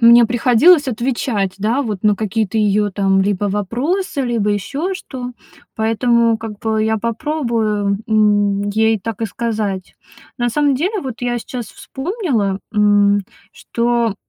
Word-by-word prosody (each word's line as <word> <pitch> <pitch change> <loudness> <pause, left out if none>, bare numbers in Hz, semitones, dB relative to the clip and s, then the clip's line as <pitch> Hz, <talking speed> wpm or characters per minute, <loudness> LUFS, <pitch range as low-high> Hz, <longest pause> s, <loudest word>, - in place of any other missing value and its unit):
м, 230 - +7
мне 235 0 +8
приходилось 255 +7 +4
отвечать, 230 -5 -1
да, 230 +7 0
вот 210 -6 -4
на 210 -1 +4
какие-то 215 0 -2
её 210 0 +2
там 195 0 +2
либо 205 0 0
вопросы, 260 - -2
либо 230 -4 0
ещё 280 - -2
что. 250 -8 -7 0.4
Поэтому 230 +1 +2
как 220 -2 -7
бы 220 -1 0
я 220 0 +1
попробую, 230 -5 -1
м, 205 -2 +2
ей 220 +1 +2
так 225 +2 -6
и - - +1
сказать. 210 -4 -3 0.4
На 240 0 +1
самом 285 +3 +2
деле 375 +9 -1
вот 255 -6 -6
я 245 -1 -1
сейчас 240 -1 -6
вспомнила, 265 - -3
м, 205 -1 +4 0.3
что 235 -2 -1
225 Hz, 145 wpm, -18 LUFS, 205-245 Hz, 0.4 s, мне